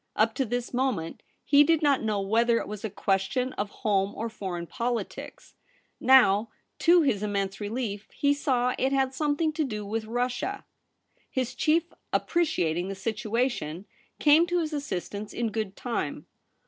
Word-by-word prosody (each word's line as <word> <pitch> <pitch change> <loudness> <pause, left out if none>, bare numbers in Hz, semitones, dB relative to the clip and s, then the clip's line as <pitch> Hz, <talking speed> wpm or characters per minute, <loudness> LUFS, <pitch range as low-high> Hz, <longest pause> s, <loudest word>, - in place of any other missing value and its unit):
Up 220 +1 +3
to 265 - 0
this 245 +2 -3
moment 245 -11 -1 0.2
he 285 0 +6
did 320 0 +2
not 285 -2 +3
know 215 -2 0
whether 230 +4 +2
it - - -3
was 210 -1 -7
a 220 - -2
question 205 +7 0
of 205 0 -3 0.2
home 200 -1 +2
or 230 - -3
foreign 185 -5 -5
politics. 240 +4 -4 0.5
Now, 230 -5 +5 0.3
to 345 0 +5
his 240 -9 +1
immense 200 -1 -2
relief, 210 -1 -3
he 285 0 +2
saw 250 -3 +1
it 265 +1 +1
had 270 -1 +1
something 300 +2 0
to 310 0 0
do 210 -6 -4
with 220 +2 -3
Russia. 245 - -2 0.6
His 255 -2 -2
chief, 330 +2 +1 0.2
appreciating 180 - 0
the 195 - -4
situation, 215 - -2 0.3
came 310 +3 +5
to 350 0 +1
his 310 -1 -3
assistance 205 -6 -4
in 230 -2 -1
good 215 -3 -3
time. 225 - -3
235 Hz, 160 wpm, -27 LUFS, 205-275 Hz, 0.6 s, he